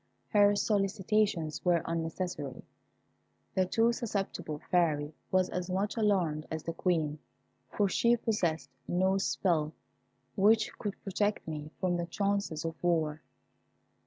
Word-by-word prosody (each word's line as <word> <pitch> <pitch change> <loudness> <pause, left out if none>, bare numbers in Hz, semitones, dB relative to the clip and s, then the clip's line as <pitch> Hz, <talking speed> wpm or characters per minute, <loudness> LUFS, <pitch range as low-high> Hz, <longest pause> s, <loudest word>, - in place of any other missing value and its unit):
Her 205 -1 +5
solicitations 200 -5 +1
were 175 -2 +3
unnecessary. 165 -4 -3 0.9
The 185 -1 +2
too 230 +4 +3
susceptible 200 -9 -3
Fairy 155 -4 +2 0.2
was 185 -1 +3
as 180 0 -3
much 195 +3 -1
alarmed 185 -9 +1
as 160 -1 -4
the 165 - -3
Queen, 160 -4 0 0.5
for 205 - +1
she 235 +5 +3
possessed 180 -9 -1 0.2
no 190 +2 +2
spell 160 -5 +1 0.6
which 220 +3 +4
could 205 -2 -4
protect 205 0 -1
me 150 -1 -5
from 180 -2 +1
the 170 0 -2
chances 200 -4 -1
of 165 - -5
war. 155 -3 +1
180 Hz, 125 wpm, -31 LUFS, 160-205 Hz, 0.9 s, Her